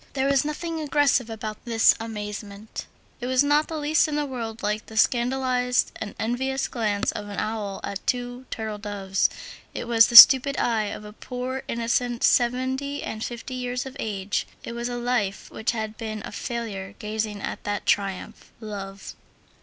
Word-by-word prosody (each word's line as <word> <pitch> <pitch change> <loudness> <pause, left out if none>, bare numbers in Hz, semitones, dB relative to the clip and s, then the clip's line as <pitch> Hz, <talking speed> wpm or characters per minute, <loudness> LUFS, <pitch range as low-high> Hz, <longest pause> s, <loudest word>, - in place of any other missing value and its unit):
There 270 -1 0
was 275 -1 +3
nothing 320 +2 -3
aggressive 290 -5 +2
about 215 -1 -6
this 230 -2 +5
amazement; 210 -1 -6 0.3
it 245 - -4
was 260 +1 +3
not 295 +1 +3
the 320 - -4
least 300 +1 +2
in 300 - -3
the 295 0 0
world 230 -4 -6
like 210 +1 -1
the 220 - -9
scandalized 250 +1 +2
and 215 -2 -6
envious 265 +4 -1
glance 215 -3 -1
of 205 - -6
an 205 - -7
owl 210 -3 -3
at 200 +1 -5
two 245 +1 -2
turtledoves, 205 -3 -1 0.5
it - - -4
was 230 -2 +6
the 240 - -4
stupid 270 +4 +11
eye 225 -3 +1
of 210 +1 -6
a 210 - -10
poor 255 +3 -5
innocent 235 +1 -1
seven 255 +2 +2
and 280 -6 -4
fifty 240 +2 -6
years 250 0 -3
of 265 0 -8
age; 205 -2 -2 0.2
it - - -6
was 235 +1 -3
a 245 - -3
life 240 -5 -1
which 220 - -3
had 220 -2 -2
been 215 -2 -5
a - - -7
failure 205 -5 -5
gazing 215 -1 -3
at - - -5
that 205 -1 -3
triumph, 195 +2 -1
love. 200 -3 -7
235 Hz, 170 wpm, -25 LUFS, 210-255 Hz, 0.5 s, stupid